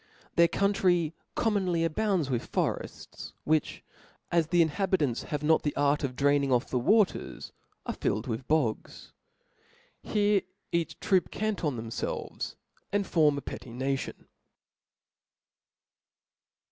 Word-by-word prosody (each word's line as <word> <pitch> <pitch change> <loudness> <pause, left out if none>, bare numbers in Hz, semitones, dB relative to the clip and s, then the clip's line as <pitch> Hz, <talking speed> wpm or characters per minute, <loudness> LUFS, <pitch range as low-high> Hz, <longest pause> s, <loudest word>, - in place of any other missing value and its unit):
Their 170 0 +6
country 180 -5 +2 0.2
commonly 190 -7 +1
abounds 180 -1 +1
with 125 -4 -2
forefts; - - -3
\7hich, 155 -1 +1 0.5
as 170 -2 +3
this 175 +1 +2
inhabitants 160 - +1
have 150 -2 -2
not 160 +1 +4
the 145 - -2
art 145 +1 +2
of 130 -2 -2
cjraining 140 +1 +2
off 125 +1 +3
the 125 - +1
waters, 210 - +1 0.3
are - - -2
filled 110 - -1
with 120 0 -4
bogs; 150 -8 -1 0.9
here 205 -1 +2 0.3
each 170 -1 -1
troop 190 -2 +2
canton 200 - -1
themfclvcs, 115 0 -4 0.4
and 200 0 +1
form 150 -5 +3
a - - -3
petty 130 - -8
Option. 135 +1 -3
155 Hz, 120 wpm, -29 LUFS, 140-190 Hz, 0.9 s, Their